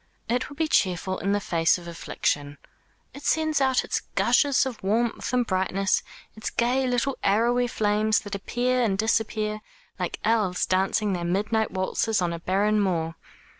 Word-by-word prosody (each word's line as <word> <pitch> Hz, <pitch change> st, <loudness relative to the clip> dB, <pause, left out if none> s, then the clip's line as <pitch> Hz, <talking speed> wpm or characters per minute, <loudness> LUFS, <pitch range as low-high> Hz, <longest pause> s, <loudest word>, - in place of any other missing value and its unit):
It 245 Hz, +2 st, -1 dB
will 285 Hz, -, -11 dB
be 320 Hz, +2 st, 0 dB
cheerful 185 Hz, -, +1 dB
in 195 Hz, -, -1 dB
the 205 Hz, -, +2 dB
face 165 Hz, -3 st, +2 dB
of 175 Hz, -1 st, -11 dB
affliction. 145 Hz, -3 st, -2 dB, 0.6 s
It 280 Hz, -, -10 dB
sends 315 Hz, -1 st, +1 dB
out 265 Hz, -1 st, +3 dB
its -, -, -1 dB, 0.2 s
gushes 280 Hz, -2 st, +3 dB
of 255 Hz, -4 st, -5 dB
warmth 225 Hz, +5 st, 0 dB
and 250 Hz, -1 st, +2 dB
brightness, 190 Hz, -1 st, +1 dB, 0.3 s
its 220 Hz, -, -4 dB
gay 255 Hz, +2 st, +1 dB
little 250 Hz, +2 st, 0 dB
arrowy 240 Hz, +4 st, +2 dB
flames 215 Hz, -1 st, +1 dB
that 205 Hz, -1 st, -8 dB
appear 245 Hz, +5 st, 0 dB
and 205 Hz, -5 st, +1 dB
disappear 215 Hz, 0 st, 0 dB, 0.4 s
like -, -, -3 dB
elves 210 Hz, -5 st, +1 dB
dancing 195 Hz, +2 st, +1 dB
their 175 Hz, -1 st, -3 dB
midnight 210 Hz, +5 st, 0 dB
waltzes 200 Hz, +3 st, 0 dB
on 175 Hz, -2 st, 0 dB
a 170 Hz, -, -5 dB
barren 205 Hz, +5 st, +1 dB
moor. 165 Hz, -4 st, 0 dB
210 Hz, 165 wpm, -25 LUFS, 190-240 Hz, 0.6 s, out